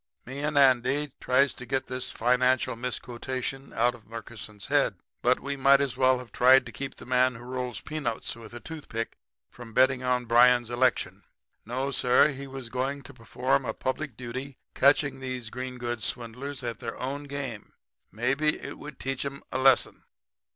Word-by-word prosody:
"Me 130 Hz, +3 st, -6 dB
and 150 Hz, 0 st, -1 dB
Andy 135 Hz, +2 st, +4 dB
tries 130 Hz, +1 st, +3 dB
to -, -, -9 dB
get 130 Hz, +1 st, -1 dB
this 130 Hz, 0 st, -4 dB
financial 125 Hz, +1 st, +2 dB
misquotation 125 Hz, +2 st, -4 dB
out 120 Hz, +1 st, +2 dB
of 115 Hz, -3 st, -16 dB
Murkison's 110 Hz, -2 st, -7 dB
head, -, -, +2 dB, 0.3 s
but 125 Hz, +1 st, +3 dB
we 140 Hz, +1 st, -3 dB
might 135 Hz, 0 st, +5 dB
as 140 Hz, -3 st, -1 dB
well 130 Hz, 0 st, +4 dB
have 125 Hz, -3 st, -10 dB
tried 130 Hz, +3 st, +6 dB
to 115 Hz, -, -8 dB
keep 135 Hz, +3 st, -6 dB
the -, -, -12 dB
man 125 Hz, 0 st, +3 dB
who 115 Hz, -, -10 dB
rolls 125 Hz, -1 st, -4 dB
peanuts 150 Hz, -8 st, -3 dB
with 115 Hz, -1 st, -11 dB
a -, -, -6 dB
toothpick 120 Hz, -7 st, -5 dB, 0.4 s
from 120 Hz, -2 st, -11 dB
betting 130 Hz, +1 st, +4 dB
on 125 Hz, -1 st, +1 dB
Bryan's 120 Hz, 0 st, +5 dB
election. 125 Hz, +1 st, +1 dB, 0.5 s
No, 130 Hz, +3 st, -2 dB
sir; 125 Hz, +2 st, +4 dB
he 140 Hz, -1 st, -6 dB
was 130 Hz, -3 st, -7 dB
going 135 Hz, +3 st, -2 dB
to 140 Hz, -, -12 dB
perform 125 Hz, +2 st, 0 dB
a 110 Hz, -3 st, -3 dB
public 130 Hz, -2 st, -3 dB
duty 130 Hz, +2 st, -6 dB, 0.2 s
by -, -, -14 dB
catching 140 Hz, -1 st, +4 dB
these 130 Hz, -3 st, -5 dB
green 125 Hz, 0 st, -5 dB
goods 120 Hz, -2 st, -3 dB
swindlers 125 Hz, +3 st, -3 dB
at 120 Hz, -1 st, -4 dB
their 115 Hz, -2 st, -5 dB
own 140 Hz, +3 st, -4 dB
game. 140 Hz, -6 st, -6 dB, 0.4 s
Maybe 135 Hz, +8 st, +1 dB
it -, -, -8 dB
would 150 Hz, -2 st, -9 dB
teach 135 Hz, -1 st, -2 dB
'em 140 Hz, 0 st, -6 dB
a 130 Hz, -, -1 dB
lesson. 130 Hz, 0 st, +4 dB
130 Hz, 180 wpm, -28 LUFS, 120-135 Hz, 0.5 s, tried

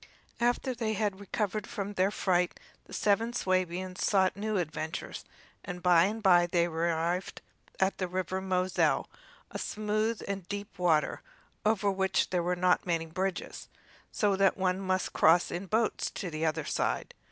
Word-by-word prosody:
After 245 Hz, +2 st, +1 dB
they 225 Hz, -2 st, -2 dB
had 205 Hz, -2 st, -1 dB
recovered 210 Hz, +1 st, -2 dB
from 200 Hz, 0 st, -4 dB
their 190 Hz, 0 st, +2 dB
fright 180 Hz, -3 st, 0 dB, 0.3 s
the -, -, -18 dB
seven 225 Hz, +3 st, +1 dB
Swabians 185 Hz, -2 st, -1 dB
sought 190 Hz, -2 st, +3 dB
new 210 Hz, +1 st, -1 dB
adventures, 160 Hz, -2 st, -4 dB, 0.4 s
and 180 Hz, -1 st, -7 dB
by 175 Hz, -2 st, +6 dB
and 215 Hz, +2 st, -3 dB
by 175 Hz, -3 st, +6 dB
they 175 Hz, -1 st, +2 dB
arrived 170 Hz, +2 st, -1 dB, 0.4 s
at 190 Hz, +1 st, +1 dB
the 185 Hz, -, 0 dB
River 185 Hz, +1 st, -2 dB
Moselle, 185 Hz, -1 st, +1 dB, 0.4 s
a -, -, -5 dB
smooth 215 Hz, +1 st, -1 dB
and 195 Hz, -3 st, -4 dB
deep 200 Hz, -1 st, -6 dB
water, 165 Hz, -4 st, +2 dB, 0.4 s
over 210 Hz, -2 st, +2 dB
which 190 Hz, 0 st, +1 dB
there 180 Hz, -2 st, +1 dB
are 180 Hz, -, +1 dB
not 180 Hz, 0 st, +2 dB
many 165 Hz, -2 st, 0 dB
bridges; 185 Hz, +3 st, -4 dB, 0.4 s
so 205 Hz, -2 st, +2 dB
that 195 Hz, 0 st, +3 dB
one 185 Hz, -1 st, +1 dB
must 185 Hz, -1 st, -1 dB
cross 165 Hz, +2 st, +4 dB
in 180 Hz, +3 st, -4 dB
boats 220 Hz, +3 st, 0 dB
to 180 Hz, -4 st, -5 dB
the 155 Hz, +1 st, -1 dB
other 155 Hz, -, -1 dB
side. -, -, -1 dB
185 Hz, 160 wpm, -30 LUFS, 175-205 Hz, 0.4 s, by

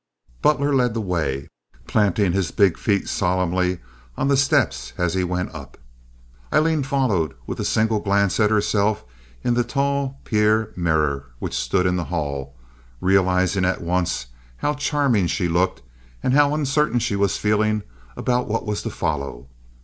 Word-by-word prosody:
Butler 145 Hz, -1 st, +2 dB
led 125 Hz, -4 st, +2 dB
the -, -, 0 dB
way, 80 Hz, -9 st, -2 dB, 0.4 s
planting 100 Hz, -, +2 dB
his 95 Hz, -1 st, 0 dB
big 100 Hz, -5 st, +3 dB
feet 100 Hz, -2 st, 0 dB
solemnly 90 Hz, 0 st, 0 dB, 0.4 s
on 135 Hz, -, 0 dB
the 140 Hz, -, +4 dB
steps 130 Hz, -, +1 dB
as 90 Hz, -1 st, 0 dB
he 95 Hz, -1 st, +1 dB
went 90 Hz, 0 st, -2 dB
up. 70 Hz, -4 st, -10 dB, 0.7 s
Aileen 155 Hz, 0 st, +3 dB
followed 115 Hz, -, 0 dB
with -, -, -5 dB
a -, -, -1 dB
single 110 Hz, 0 st, +1 dB
glance 100 Hz, -1 st, +1 dB
at 105 Hz, -1 st, +4 dB
herself 105 Hz, -, +1 dB, 0.4 s
in 120 Hz, -, +2 dB
the 120 Hz, 0 st, +2 dB
tall 140 Hz, +1 st, -1 dB
pier 110 Hz, 0 st, +1 dB
mirror 75 Hz, -5 st, 0 dB
which -, -, -5 dB
stood 90 Hz, +9 st, 0 dB
in 90 Hz, 0 st, +2 dB
the 85 Hz, -, -2 dB
hall, 70 Hz, -5 st, -4 dB, 0.4 s
realizing 95 Hz, +1 st, +2 dB
at 95 Hz, -1 st, 0 dB
once 90 Hz, -6 st, -1 dB, 0.3 s
how 145 Hz, -, 0 dB
charming 145 Hz, -, +1 dB
she 90 Hz, +1 st, 0 dB
looked 85 Hz, -5 st, 0 dB, 0.4 s
and 130 Hz, -, +1 dB
how 145 Hz, +1 st, +4 dB
uncertain 150 Hz, -3 st, +1 dB
she 115 Hz, -3 st, 0 dB
was 100 Hz, -1 st, +1 dB
feeling 105 Hz, 0 st, +1 dB, 0.3 s
about 125 Hz, 0 st, 0 dB
what 110 Hz, +1 st, -2 dB
was 105 Hz, -1 st, -2 dB
to -, -, -4 dB
follow. 70 Hz, -5 st, -4 dB
100 Hz, 155 wpm, -22 LUFS, 90-120 Hz, 0.7 s, the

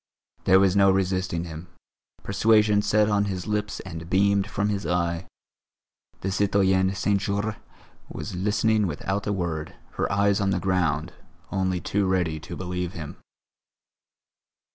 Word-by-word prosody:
There 95 Hz, 0 st, +6 dB
was 95 Hz, -1 st, +3 dB
no 100 Hz, -1 st, +5 dB
resisting 95 Hz, -3 st, 0 dB
him; 80 Hz, 0 st, -8 dB, 0.6 s
persuasion 105 Hz, +1 st, +3 dB
sat 105 Hz, 0 st, +3 dB
on 105 Hz, -1 st, +2 dB
his 95 Hz, -3 st, -4 dB
lips 105 Hz, -1 st, -2 dB
and 85 Hz, -3 st, -8 dB
beamed 100 Hz, +1 st, +3 dB
from 105 Hz, 0 st, -1 dB
his 100 Hz, -1 st, -2 dB
eye. 85 Hz, 0 st, -1 dB, 0.9 s
The 95 Hz, -, -2 dB
citoyenne 95 Hz, -1 st, +2 dB
Saint 100 Hz, +1 st, +1 dB
Jorre 100 Hz, +2 st, -2 dB, 0.5 s
was 105 Hz, -, -6 dB
listening 105 Hz, +3 st, +1 dB
without 95 Hz, +6 st, -3 dB
a -, -, +1 dB
word, 85 Hz, -5 st, -3 dB, 0.2 s
her -, -, 0 dB
eyes 100 Hz, 0 st, +2 dB
on 100 Hz, -, +1 dB
the 95 Hz, -1 st, +1 dB
ground, 90 Hz, -3 st, 0 dB, 0.4 s
only 95 Hz, -1 st, 0 dB
too 100 Hz, +2 st, 0 dB
ready 90 Hz, -4 st, 0 dB
to 85 Hz, +3 st, -8 dB
believe 90 Hz, -1 st, -4 dB
him. 75 Hz, -4 st, -7 dB
95 Hz, 140 wpm, -25 LUFS, 90-100 Hz, 0.9 s, There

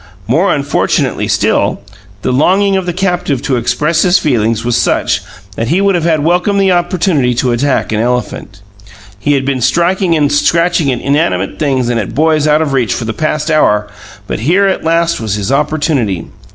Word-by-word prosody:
More 160 Hz, -, +2 dB
unfortunately 140 Hz, -1 st, 0 dB
still, -, -, 0 dB, 0.4 s
the -, -, 0 dB
longing 195 Hz, +8 st, +2 dB
of 190 Hz, -2 st, -2 dB
the -, -, 0 dB
captive 180 Hz, -7 st, -2 dB
to 135 Hz, -, 0 dB
express 150 Hz, +7 st, 0 dB
his 180 Hz, +1 st, +4 dB
feelings 115 Hz, -5 st, 0 dB
was 120 Hz, -1 st, 0 dB
such -, -, 0 dB, 0.3 s
that 115 Hz, -, -2 dB
he 170 Hz, +8 st, +1 dB
would 200 Hz, 0 st, +2 dB
have 165 Hz, -2 st, +1 dB
welcomed 180 Hz, +5 st, +1 dB
the 195 Hz, -1 st, +3 dB
opportunity 175 Hz, -7 st, +1 dB
to 125 Hz, +1 st, 0 dB
attack 130 Hz, +2 st, 0 dB
an 105 Hz, -, -1 dB
elephant. 115 Hz, -4 st, -3 dB, 0.6 s
He 145 Hz, +7 st, 0 dB
had 135 Hz, -1 st, 0 dB
been 135 Hz, -2 st, -1 dB
striking 170 Hz, -, +1 dB
and 145 Hz, -2 st, +1 dB
scratching 165 Hz, 0 st, +1 dB
at 125 Hz, -, -3 dB
inanimate 100 Hz, -, -1 dB
things 135 Hz, -5 st, 0 dB
and 120 Hz, -1 st, 0 dB
at 105 Hz, -, -5 dB
boys 155 Hz, +1 st, +2 dB
out 150 Hz, +1 st, +3 dB
of 145 Hz, -3 st, -3 dB
reach 120 Hz, -7 st, 0 dB
for 115 Hz, -, -4 dB
the 110 Hz, -, -3 dB
past 155 Hz, +2 st, -2 dB
hour; 105 Hz, -9 st, +2 dB, 0.4 s
but -, -, -4 dB
here 175 Hz, -, +2 dB
at 195 Hz, -, -1 dB
last 165 Hz, -1 st, 0 dB
was 110 Hz, -3 st, -2 dB
his 105 Hz, +2 st, -3 dB
opportunity. 140 Hz, -, 0 dB
145 Hz, 185 wpm, -13 LUFS, 120-170 Hz, 0.6 s, his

